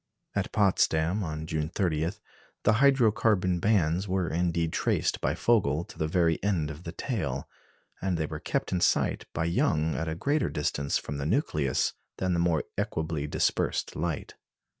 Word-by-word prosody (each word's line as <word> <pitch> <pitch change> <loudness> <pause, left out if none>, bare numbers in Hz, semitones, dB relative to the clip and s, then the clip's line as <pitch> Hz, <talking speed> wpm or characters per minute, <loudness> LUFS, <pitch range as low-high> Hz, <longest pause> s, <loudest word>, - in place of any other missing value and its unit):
At - - -1
Potsdam, 95 -2 +2
on 80 -2 -4
June 80 -1 -2
30, 85 -2 0 0.5
the 105 - +5
hydro 135 -5 +5
carbon 95 -5 +1
bands 95 -2 +2
were 95 -2 0
indeed 85 -1 0
traced - - 0
by - - 0
Vogel 85 -10 +2
to - - -14
the 80 - +1
very 85 -1 +2
end 85 -7 0
of 75 +4 -10
the 85 - -4
tail; 80 - -3 0.5
and 95 -2 0
they 80 - 0
were - - -6
kept - - -2
in 90 - 0
sight - - +2
by 80 - -1
Young 80 -1 +1
at 80 - -2
a 80 - -2
greater 140 - 0
distance 70 -1 -1
from 70 - -5
the 70 - -3
nucleus 75 - +1 0.2
than 95 -1 0
the 85 - +1
more 85 -3 +2 0.2
equably 80 -2 -2
dispersed - - 0
light. 80 -2 -3
85 Hz, 170 wpm, -28 LUFS, 80-95 Hz, 0.5 s, the